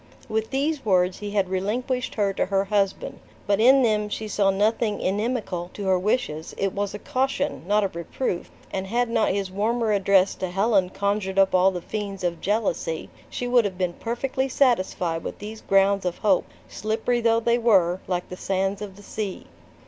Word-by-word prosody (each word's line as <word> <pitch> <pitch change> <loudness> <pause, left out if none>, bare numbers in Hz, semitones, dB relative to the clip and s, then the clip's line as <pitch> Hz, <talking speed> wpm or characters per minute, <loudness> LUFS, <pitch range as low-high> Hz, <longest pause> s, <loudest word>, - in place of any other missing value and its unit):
With 220 0 -1
these 280 +2 -1
words 185 -3 +2
he 205 - -5
had 200 -2 +1
relinquished 245 +7 -2
her 200 -2 +1
to - - -1
her 195 0 +1
husband. 200 -1 -1 0.3
But 200 0 +2
in 260 +4 +6
them 210 -2 +1
she 215 +1 -4
saw 205 -2 +2
nothing 210 +2 +1
inimical 195 -3 -2
to 205 - -5
her 190 -1 +3
wishes; 180 -6 -1
it 195 -1 -1
was 205 0 -2
a - - -3
caution, 270 +5 -1
not 210 +1 +3
a - - +2
reproof, 175 +2 -4 0.2
and 190 0 -2
had 240 +3 0
not 225 - +2
his 195 -1 -1
warmer 220 +3 0
address 195 -1 +3
to 185 - -3
Helen 195 0 +2
conjured 200 -1 -1
up 195 -1 +4
all 185 +1 +5
the 180 -2 -4
fiends 200 -3 -5
of 170 -2 -2
jealousy, 195 -6 -1 0.2
she 245 - -4
would 245 -1 +4
have 195 -3 -3
been 180 -2 -1
perfectly 260 +5 -2
satisfied 185 -11 +1
with - - -5
these 215 +2 -8
grounds 195 0 +3
of 180 -1 -2
hope 200 -4 +2 0.2
slippery 225 +3 -1
though 230 0 +3
they 235 +1 +2
were, 190 -6 +3
like 180 -1 -2
the 180 - -7
sands 195 +1 -1
of 200 -2 -7
the 205 - -14
sea. 200 -2 -5
200 Hz, 190 wpm, -24 LUFS, 190-225 Hz, 0.3 s, in